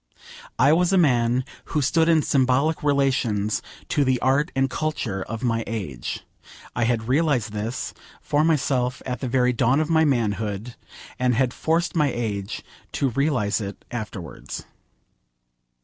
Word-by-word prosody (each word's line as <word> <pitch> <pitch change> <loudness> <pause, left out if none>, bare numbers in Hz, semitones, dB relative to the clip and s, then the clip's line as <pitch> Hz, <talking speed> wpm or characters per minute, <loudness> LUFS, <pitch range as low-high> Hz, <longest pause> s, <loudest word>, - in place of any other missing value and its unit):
I 145 - +5
was 175 +2 +3
a 195 - +4
man 125 -5 +3 0.2
who 150 - -1
stood 165 +4 +3
in 160 -2 +4
symbolic 135 +3 +2
relations 125 -7 +1 0.3
to 145 - +2
the 130 -2 +2
art 140 +5 +2
and 135 0 +3
culture 125 -8 -2
of 115 +4 -5
my 115 -2 +1
age. 75 - -4 0.5
I 120 - +1
had 115 -1 0
realised 135 -5 +2
this 110 +4 -4 0.3
for 145 +1 +1
myself 135 -5 +1
at 125 -1 -3
the 130 - -3
very 125 0 +3
dawn 125 +3 +3
of 155 +1 0
my 160 0 +5
manhood, 110 -4 -1 0.5
and 125 -1 +2
had 125 0 +1
forced 165 +2 0
my 150 -4 +3
age 105 -5 -3 0.3
to 135 - +1
realise 120 -6 +1
it 100 -1 -7
afterwards. 105 -8 -6
125 Hz, 150 wpm, -24 LUFS, 115-145 Hz, 0.5 s, I